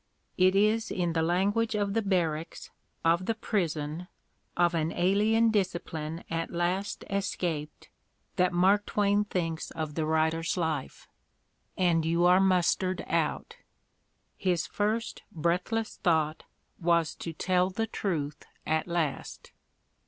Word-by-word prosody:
It 185 +1 +4
is 215 +3 +2
in 175 -2 -1
the 160 - +1
language 200 +7 +1
of 205 -1 0
the 225 - +1
barracks, 170 -6 -2 0.3
of 170 +3 +2
the 225 - +1
prison, 170 -6 -2 0.5
of 175 0 +3
an 165 -1 0
alien 215 +5 +3
discipline 170 -5 -2
at 165 0 -2
last 180 +4 -2
escaped 175 -6 -3 0.5
that 180 0 +2
Mark 190 +4 +3
Twain 205 0 +2
thinks 165 -5 -3
of 155 -2 -4
the 155 0 -1
writer's 160 +2 +1
life. 160 -5 -3 0.7
"And 170 -3 +3
you 170 +2 +2
are 180 +1 +6
mustered 185 0 +2
out." - - -1 0.8
His 180 -4 0
first 215 +2 -2
breathless 180 +6 -1
thought 160 -3 +1 0.3
was 170 -2 +2
to 165 - -5
"tell 180 +3 +1
the 225 +4 -2
truth" 160 -9 -3 0.2
at 160 +1 0
last. 170 -5 -3
175 Hz, 125 wpm, -29 LUFS, 165-200 Hz, 0.8 s, are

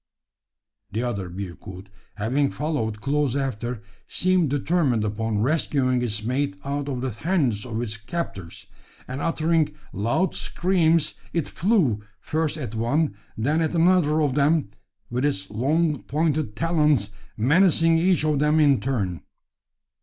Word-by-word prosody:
The 110 +4 -2
other 100 -7 -3
bearcoot 95 +1 -8 0.3
having 130 +7 +1
followed 115 -9 -2
close 140 -1 0
after, 120 -4 -3 0.2
seemed 185 -4 +2
determined 140 -5 +1
upon 105 0 -1
rescuing 130 -3 +1
its 110 -3 -2
mate 140 +5 -1
out 140 0 -2
of 125 -3 -3
the 130 -1 -2
hands 130 - 0
of 115 -2 -3
its 110 -2 -3
captors; 110 - -6 0.4
and 130 +3 -5
uttering 165 -1 +1 0.2
loud 115 - 0
screams, 170 -3 +1 0.2
it 165 -4 0
flew, 165 - +1 0.2
first 155 0 -1
at 125 -8 -5
one, 120 +4 0 0.2
then 145 +9 +1
at 160 +2 0
another 165 -3 +3
of 145 -3 +1
them 145 -4 +2 0.4
with 125 +2 -1
its 95 -10 -1
long 150 +6 +1
pointed 150 -5 -1
talons 150 - +2 0.3
menacing 165 - +4
each 175 -2 +2
of 150 -2 +1
them 150 +2 +3
in 145 -4 +5
turn. 100 -10 -2
140 Hz, 135 wpm, -24 LUFS, 115-160 Hz, 0.4 s, in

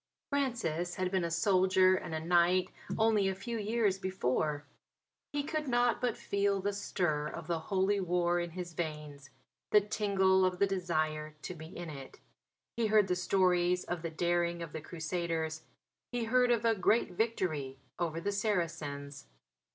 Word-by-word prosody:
Francis 220 - -1
had 185 -1 -1
been 190 -2 +1
a 170 - -1
soldier 185 +2 +4
and 165 -3 -4
a - - -1
knight 175 +2 +3 0.3
only 220 -3 +3
a 190 - -1
few 225 +4 -4
years 210 -2 +1
before. 150 -5 -1 0.7
He 290 -1 -1
could 305 0 -3
not 245 -1 +2
but 245 -3 0
feel 200 0 0
the 200 +2 -1
stir 155 -6 -1
of 165 +2 -7
the 170 0 -1
Holy 195 +1 +2
War 175 -1 +1
in 175 0 -2
his 175 0 -7
veins, 150 -4 -5 0.4
the 210 - +7
tingle 195 -2 +2
of 185 -1 +1
the 200 - +4
desire 155 -5 -1
to - - -4
be 160 -2 -9
in 170 -1 -7
it. 135 -2 -10 0.6
He 230 -2 +2
heard 210 -2 +4
the 180 - +2
stories 180 -1 +2
of 175 -1 -4
the 165 - -3
daring 170 +1 0
of 165 - -9
the 160 - -5
Crusaders; 160 -1 -3 0.5
he 245 -1 -1
heard 250 +2 +3
of 235 -1 +2
a 230 - +5
great 215 +1 +2
victory 175 - -1 0.2
over 165 -2 -1
the 200 +4 -1
Saracens. 160 - -2
180 Hz, 165 wpm, -32 LUFS, 165-200 Hz, 0.7 s, the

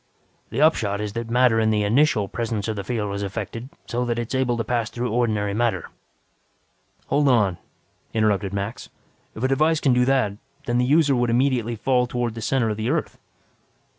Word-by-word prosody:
"The 120 +6 -2
upshot 105 -10 +2
is 105 -1 -4
that 115 0 -4
matter 120 -1 +4
in 110 0 +2
the 105 -1 +1
initial 110 -1 +2
presence 115 -1 -3
of 110 - -2
the 100 - -4
field 105 -2 -2
is 100 - -3
affected 115 +5 -5 0.2
so 120 0 -2
that 120 -1 -1
it 120 +2 -4
is 130 - +1
able 120 -2 0
to 115 - -1
pass 120 -2 -1
through 120 -1 -3
ordinary 110 -4 0
matter 120 +2 -1 0.6
" - - -41
"Hold 145 +1 +2
on," 105 -9 +3 0.5
interrupted 105 -3 +1
Max. 100 +3 -4 0.5
"If 110 - -6
a - - +4
device 155 +4 +2
can 135 -4 +3
do 125 0 +3
that, 125 -7 +1 0.3
then 120 0 0
the 125 - +2
user 145 0 +4
would 120 -1 +1
immediately 120 -1 +1
fall 125 +2 +1
towards 120 -2 -2
the 115 - -7
center 120 0 +1
of 105 - -4
the 110 +2 -2
Earth." 155 +2 -2
120 Hz, 200 wpm, -23 LUFS, 105-125 Hz, 0.6 s, matter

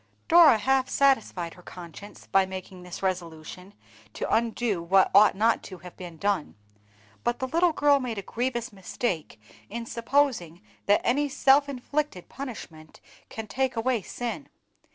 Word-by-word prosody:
Dora 325 -8 +7
half 265 +4 +1
satisfied 225 -11 +1
her 180 - -16
conscience 180 +3 -11
by 195 -1 +2
making 185 0 -8
this 180 +1 -9
resolution 180 +1 -5 0.4
to - - -3
undo 225 -4 0
what 190 +3 +3
ought 205 +1 +6
not 225 +3 +2
to 185 - -9
have 180 0 -12
been 175 -3 -9
done; 200 -2 -1 0.7
but 240 0 0
the 260 - -3
little 335 +5 +2
girl 290 -2 +3
made 245 -4 -4
a 200 - -4
grievous 240 0 -3
mistake 185 - -4 0.3
in 235 +2 -5
supposing 230 - 0 0.3
that 205 +1 +4
any 285 +4 +1
self 275 +1 +4
inflicted 280 - -3
punishment 175 - -9 0.3
can 220 - -6
take 260 +3 -1
away 230 0 0
sin. 245 +7 -6
225 Hz, 150 wpm, -26 LUFS, 185-260 Hz, 0.7 s, Dora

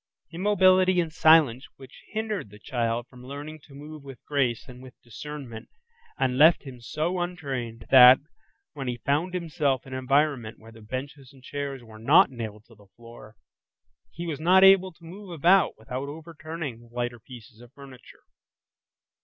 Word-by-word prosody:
Immobility 185 0 +3
and 165 -3 -2
silence 155 -6 +4
which 135 0 -15
hindered 215 - -4
the 105 - -14
child 115 +1 -2
from 125 -1 -16
learning 145 +4 -8
to 140 - -16
move 150 +1 -11
with 135 -2 -11
grace 130 -6 -1
and 125 -1 -12
with 130 -1 -15
discernment, 125 -1 -9 0.5
and 130 0 0
left 160 +3 +6
him 130 -4 -11
so 155 +10 -3
untrained, 135 -10 -5
that, 130 -1 +9 0.6
when 140 -3 -6
he 120 -1 -3
found 155 +9 -1
himself 150 -7 -1
in 135 - -10
an 130 - -3
environment 135 -3 0
where 110 +1 -16
the 115 0 -15
benches 130 +4 -7
and 135 -2 -20
chairs 140 -2 -6
where 110 -1 -14
not 145 - +5
nailed 110 -3 -8
to 115 - -20
the 105 -2 -21
floor, 115 -2 -14 0.7
he 170 - -8
was 155 -4 -4
not 185 +4 +5
able 195 -1 +6
to 170 0 -25
move 190 +4 -11
about 175 +3 +3
without 125 +5 -6
overturning 155 -4 -7
the 120 - -18
lighter 120 0 -4
pieces 120 -1 -14
of 120 0 -16
furniture. 135 -3 -15
135 Hz, 170 wpm, -26 LUFS, 120-160 Hz, 0.7 s, that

